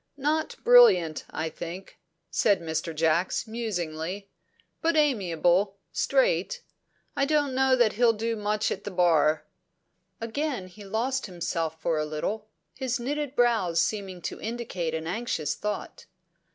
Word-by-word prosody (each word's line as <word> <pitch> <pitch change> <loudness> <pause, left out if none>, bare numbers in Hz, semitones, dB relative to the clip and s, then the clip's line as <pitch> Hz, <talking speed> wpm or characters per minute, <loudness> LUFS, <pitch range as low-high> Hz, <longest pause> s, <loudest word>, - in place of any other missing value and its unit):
"Not 305 +3 0
brilliant, 185 - +6
I 160 - -3
think," 175 +4 -8 0.3
said 205 -2 +3
Mr. 160 0 -3
Jacks 165 +3 +1
musingly. 195 -4 -4 0.5
"But 330 0 +2
amiable, 195 - +2
straight. - - +1 0.5
I 275 - +2
don't 290 -2 +1
know 265 0 +4
that 240 -4 +3
he'll 235 +2 +4
do 225 +1 -2
much 210 0 -1
at 195 - -4
the - - -4
Bar." 165 -4 +3 0.7
Again 245 -1 -2
he 205 +3 -13
lost 235 +6 -1
himself 165 -3 -3
for 160 -1 0
a 155 - 0
little, 200 +8 -3 0.3
his 260 -1 -2
knitted 290 +2 -3
brows 225 -9 +2
seeming 190 -2 -2
to - - -5
indicate 215 -8 -3
an 160 0 -4
anxious 165 -6 -2
thought. 210 -1 -5
205 Hz, 135 wpm, -27 LUFS, 170-250 Hz, 0.7 s, brilliant